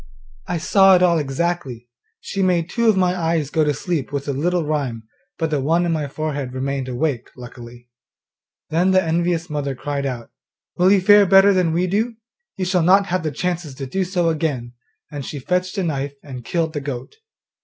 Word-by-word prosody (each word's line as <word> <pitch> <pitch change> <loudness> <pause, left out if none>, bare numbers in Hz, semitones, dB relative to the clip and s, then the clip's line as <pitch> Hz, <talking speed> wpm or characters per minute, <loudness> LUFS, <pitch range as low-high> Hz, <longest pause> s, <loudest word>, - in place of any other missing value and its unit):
I 175 - -1
saw 195 +3 +5
it 180 - +3
all 170 -2 +4
exactly. 135 -4 -3 0.3
She 195 - -4
made 175 -3 +1
two 235 -1 +2
of 210 - +3
my 180 -1 +2
eyes 165 -4 -1
go 160 - +2
to 150 - +2
sleep 160 -1 -3
with 140 0 -4
a 140 - -1
little 170 +4 0
rhyme, 140 -7 -2 0.3
but 160 -1 -2
the 145 -3 0
one 165 +5 +2
in 170 - 0
my 155 -3 -1
forehead 145 -3 -4
remained 135 0 -3
awake, 130 -1 -2
luckily!' 120 -1 -11 0.8
Then 175 +4 +2
the 190 0 +4
envious 170 +1 0
mother 145 -3 -3
cried 140 +1 -3
out, 120 -3 -6 0.4
'Will 180 +2 +4
you 200 -2 +4
fare 205 +1 +6
better 195 +2 +6
than 180 -3 +2
we 175 +3 +1
do? 220 +6 -1 0.4
you 190 - -1
shall 180 -1 +1
not 190 +4 +5
have 185 - +1
the 160 - -2
chance 170 +1 -3
to 135 - -6
do 190 +9 -1
so 175 -2 0
again!' 145 -7 -2 0.4
and 145 -2 -5
she 145 - -6
fetched 180 - -2
a 195 - 0
knife, 140 -3 -3
and 130 -4 -8
killed 165 +3 -1
the 145 - -3
goat. 135 - -6
160 Hz, 200 wpm, -21 LUFS, 140-180 Hz, 0.8 s, fare